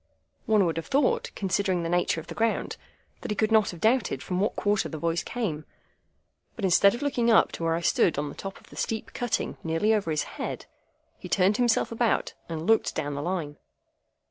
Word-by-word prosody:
One 215 -3 +4
would 165 -1 -1
have 165 - -4
thought, 470 - +1
considering 190 -2 0
the - - -2
nature 175 -1 +1
of - - -9
the - - -8
ground, 225 0 -1 0.5
that - - -6
he 210 - -1
could 215 +2 +1
not 220 -2 +4
have 175 - -7
doubted 225 +2 +1
from 180 -1 -2
what 205 - 0
quarter 205 0 0
the 160 - -6
voice 170 +2 0
came; 190 -12 -3 0.9
but 215 - -2
instead 195 +3 +5
of 240 - -6
looking 245 -5 +1
up 225 - +5
to - - -6
where 165 0 +1
I 170 - -2
stood 170 -1 +2
on 145 +1 -1
the 145 - -7
top 195 -1 -7
of - - -21
the - - -12
steep 220 -1 -3
cutting 245 -2 -2
nearly 165 +7 +1
over 205 -6 0
his 155 -2 0
head, - - -6 0.5
he - - -9
turned 195 +2 +3
himself 240 -2 +2
about, 230 0 0 0.2
and 160 -1 -4
looked 225 +2 +2
down 145 0 -2
the 140 - -4
Line. 160 -3 -3
195 Hz, 215 wpm, -27 LUFS, 165-225 Hz, 0.9 s, instead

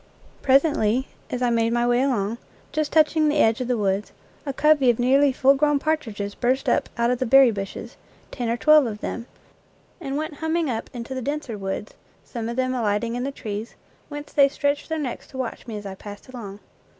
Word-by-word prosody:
Presently, 265 -3 +2 0.2
as 250 0 -2
I 245 - +2
made 230 0 +1
my 240 0 +2
way 240 +1 +3
along, 235 -4 0 0.3
just 305 -1 -1
touching 310 0 +4
the 300 - +1
edge 225 -3 +3
of 250 - -2
the 250 -1 +1
woods, 200 0 -1 0.4
a - - 0
covey 290 -1 +4
of 235 - +3
nearly 270 +3 +4
full 270 +1 +4
grown 295 +1 +2
partridges 230 -10 -2
burst 255 +4 0
up - - +1
out 235 +1 +2
of 250 - -1
the 260 - 0
berry 270 0 +7
bushes, 195 -2 -6 0.3
ten 240 -3 -3
or 235 - 0
twelve 305 0 +5
of 210 -2 -6
them, 235 +1 -5 0.7
and 280 -4 -4
went 310 -1 -4
humming 320 -2 0
up 225 - -4
into 245 +1 -6
the 260 - -4
denser 285 -3 -3
woods, 195 +1 -5 0.3
some 230 -2 -5
of 235 - -4
them 255 0 0
alighting 230 -1 0
in 245 - -2
the 280 - -2
trees, 215 -3 -6 0.3
whence 290 0 -8
they 280 -2 +5
stretched 285 +1 -1
their 320 - -1
necks 275 -6 -4
to 265 - -11
watch 255 -1 -5
me 220 -2 -5
as 205 - -8
I 195 - -5
passed 205 +1 -11
along. 210 -5 -8
250 Hz, 210 wpm, -24 LUFS, 225-285 Hz, 0.7 s, berry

